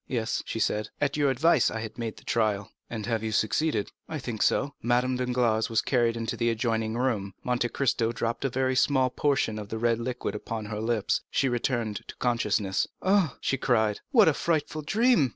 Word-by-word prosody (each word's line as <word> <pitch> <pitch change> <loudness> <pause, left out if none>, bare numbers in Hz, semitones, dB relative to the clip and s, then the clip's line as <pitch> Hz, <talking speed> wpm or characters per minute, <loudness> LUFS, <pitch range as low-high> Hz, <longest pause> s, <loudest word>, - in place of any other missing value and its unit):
"Yes," 115 -2 -1
she - - -3
said, 105 -1 0
"at 140 0 0
your 145 -2 +2
advice 140 +2 +3
I 110 - -4
have 110 - -6
made 115 -2 -4
the - - -14
trial." 105 -3 0 0.2
"And 110 -3 -4
have 115 -2 -1
you 110 0 -2
succeeded?" 110 +3 0 0.2
"I 160 - -3
think 120 -6 -5
so." 140 0 +2
Madame 125 +2 +1
Danglars 125 -3 +1
was 115 -1 +1
carried 120 -3 +1
into 115 -1 -2
the 120 0 +1
adjoining 115 -1 -1
room; 105 -7 -1
Monte 120 -1 0
Cristo 115 -2 +1
dropped 115 0 -2
a 135 - +1
very 130 +1 0
small 130 -1 +3
portion 135 -7 0
of 105 -1 -8
the 110 - -3
red 115 0 +1
liquid 125 +1 -3
upon 110 +1 -5
her 105 0 -4
lips; 110 -2 0
she 135 - +1
returned 120 -3 -1
to - - -9
consciousness. 105 -5 0 0.2
"Ah," 185 -8 +2
she 135 - 0
cried, 110 -5 +1
"what 225 -8 +6
a 160 - +5
frightful 155 0 -1
dream!" 200 - +3
120 Hz, 200 wpm, -27 LUFS, 110-130 Hz, 0.2 s, what